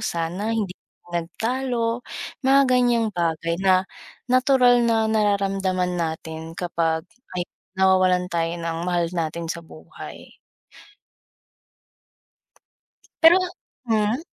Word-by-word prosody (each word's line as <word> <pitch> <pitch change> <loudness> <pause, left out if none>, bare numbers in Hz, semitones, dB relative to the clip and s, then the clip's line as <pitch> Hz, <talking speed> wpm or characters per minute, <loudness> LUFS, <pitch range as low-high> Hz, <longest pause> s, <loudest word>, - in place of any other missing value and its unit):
sana 170 +5 -2
hindi 200 -4 -1 0.4
nagtalo, 230 +7 -1 0.4
mga 270 +1 +5
ganiyang 240 -3 +2
bagay 170 -1 -1
na, 190 -1 +4 0.5
natural 255 -1 +5
na 225 -1 +2
nararamdaman 195 -4 +1
natin 160 -1 -4
kapag, 165 -2 -1 0.3
ayon, 175 -1 -2 0.3
nawawalan 185 -1 +4
tayo 170 0 0
ng 165 -1 -3
mahal 175 -1 +1
natin 165 0 -2
sa 170 +1 -4
buhay. 160 -1 -12 2.9
Pero 330 +2 +9 0.5
hmm? 220 +2 +1
185 Hz, 90 wpm, -23 LUFS, 170-230 Hz, 2.9 s, Pero